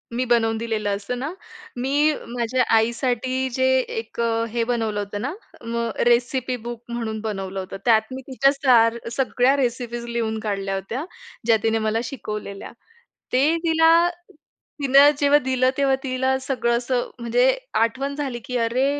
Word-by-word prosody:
मी 255 +1 0
बनवून 225 -2 +2
दिलेलं 220 -2 -2
असतं 205 +5 -5
ना, 285 +6 -4 0.4
मी 285 +5 +2
माझ्या 240 +1 0
आईसाठी 250 +3 0
जे 260 +1 +1 0.2
एक 225 +1 -6 0.3
हे 235 -1 +1
बनवलं 220 -3 -1
होतं 205 0 -4
ना, 275 +6 -3 0.3
मग 235 0 -2 0.2
रेसिपी-बुक 240 -1 0
म्हणून 230 -2 -3
बनवलं 195 -3 -4
होतं. 190 +1 -6
त्यात 225 -2 +5
मी 260 - -6
तिच्या 270 +1 +3
सार 240 -5 +4
सगळ्या 255 +1 +2
रेसिपीज 240 -2 -2
लिहून 225 -2 -2
काढल्या 195 -2 -2
होत्या, 225 - -4 0.4
ज्या 225 -1 +5
तिने 225 0 +2
मला 220 +1 +1
शिकवलेल्या. 210 -5 -6 0.6
ते 285 +6 +3
तिला 325 -1 +4 0.9
तिन 270 -1 -1 0.2
जेव्हा 285 0 +5
दिलं 255 -1 +1
तेव्हा 275 -1 +3
तिला 260 0 0
सगळं 250 -3 0
असं 245 0 -1
म्हणजे 240 +2 +2 0.3
आठवण 265 +5 0
झाली 270 -5 -3
की 250 - -2
“अरे, 240 +3 +1
240 Hz, 145 wpm, -23 LUFS, 225-260 Hz, 0.9 s, त्यात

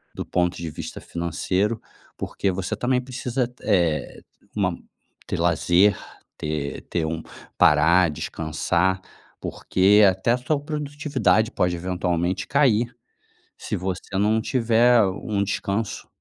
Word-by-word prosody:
do - - -4
ponto 90 0 0
de 85 -1 -5
vista 75 - -7
financeiro. 90 +6 -1 0.4
Porque 100 - -2
você 90 0 -3
também 125 0 +1
precisa 125 0 -2
t 125 0 -23
eh, 85 - +1 0.3
uma - - 0 0.5
ter - - -2
lazer, 85 +4 +3 0.4
ter 75 -2 -3
ter 85 -2 -2
um 80 +1 -3 0.4
parar, 85 +3 +5
descansar, 85 +5 -1 0.4
porque 100 +3 +3
até 95 +5 0
a 120 - +3
sua 140 +4 -1
produtividade 145 -6 0
pode 90 -6 0
eventualmente 90 +1 -1
cair 120 -4 +2 0.6
se - - -4
você 90 0 -4
não 105 +3 +2
tiver 120 0 +4
um 100 +2 -2
descanso. 100 +2 -3
95 Hz, 120 wpm, -23 LUFS, 85-120 Hz, 0.6 s, parar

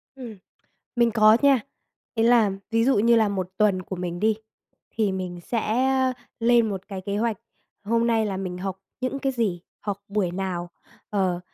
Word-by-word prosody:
Ừm, 240 -6 -9 0.6
mình 235 -1 +4
có 215 -1 +6
nha. 275 -3 +5 0.5
Ý 225 - +1
là 230 -3 +5 0.2
ví 230 0 +2
dụ 265 -3 +3
như 235 +3 +5
là 220 -2 +4
1 190 -3 -2
tuần 200 -3 +3
của 185 - -6
mình 175 -1 -4
đi, 220 0 +2 0.5
thì 215 -4 0
mình 180 -2 -4
sẽ 220 +3 -2 0.7
lên 235 -1 +4
một 195 -2 -5
cái 195 -2 -5
kế 200 +2 -3
hoạch, 225 0 0 0.5
hôm 230 +2 +1
nay 225 -2 +2
là 195 -2 -2
mình 185 -2 -4
học 190 0 -4 0.2
những 255 +2 -2
cái 270 0 -1
gì, 215 -8 -1 0.2
học 205 -2 -3
buổi 200 -3 0
nào, 175 -1 -3 0.4
ờ, 185 -4 0
210 Hz, 180 wpm, -25 LUFS, 190-230 Hz, 0.7 s, có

